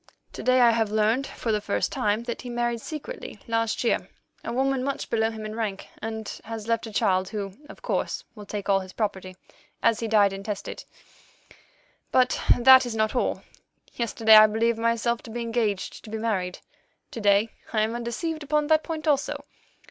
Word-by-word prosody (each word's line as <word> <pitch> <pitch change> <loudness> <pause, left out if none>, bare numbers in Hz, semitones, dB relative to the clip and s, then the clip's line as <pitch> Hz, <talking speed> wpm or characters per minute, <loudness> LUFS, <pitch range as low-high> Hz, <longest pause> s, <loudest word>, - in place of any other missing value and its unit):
To - - -6
day 255 0 +4
I 240 -1 +7
have 225 -2 +1
learned 220 +5 +1
for 230 - -3
the 210 -1 +1
first 205 - -1
time 210 +2 0
that 235 0 -5
he 250 - -7
married 240 -1 -1
secretly, 315 - -7
last 230 0 0
year, 235 - 0 0.3
a - - -4
woman 265 +1 0
much 275 0 -3
below 225 -1 +2
him 220 -1 -7
in 215 - -5
rank, 215 -3 -4
and 220 -1 -5 0.2
has 220 -1 -7
left 230 0 0
a - - -8
child, 190 -3 +1
who, 200 -3 -4 0.2
of - - -13
course, - - -2
will 210 -3 -11
take 205 -2 -5
all 195 -1 +4
his 185 -1 -9
property, 190 -4 -3 0.5
as 230 -1 +3
he 230 - -2
died 205 -3 +4
intestate. 200 +1 -6 1.3
But 255 0 +3 0.2
that 260 +1 +8
is 230 - -4
not 215 0 +1
all. 245 - 0 0.5
Yesterday 225 -2 +4
I 215 0 +9
believed 225 +2 +1
myself 230 +1 +1
to - - -12
be 240 +2 -4
engaged 225 -4 -2
to - - -11
be 220 - -4
married; 195 -5 -1 0.5
to 230 - -6
day 205 +2 +4 0.2
I 215 - +1
am 220 +1 0
undeceived 240 +7 -3
upon 300 +1 +1
that 315 0 +5
point 320 -1 -5
also. 285 0 0
225 Hz, 190 wpm, -26 LUFS, 210-240 Hz, 1.3 s, I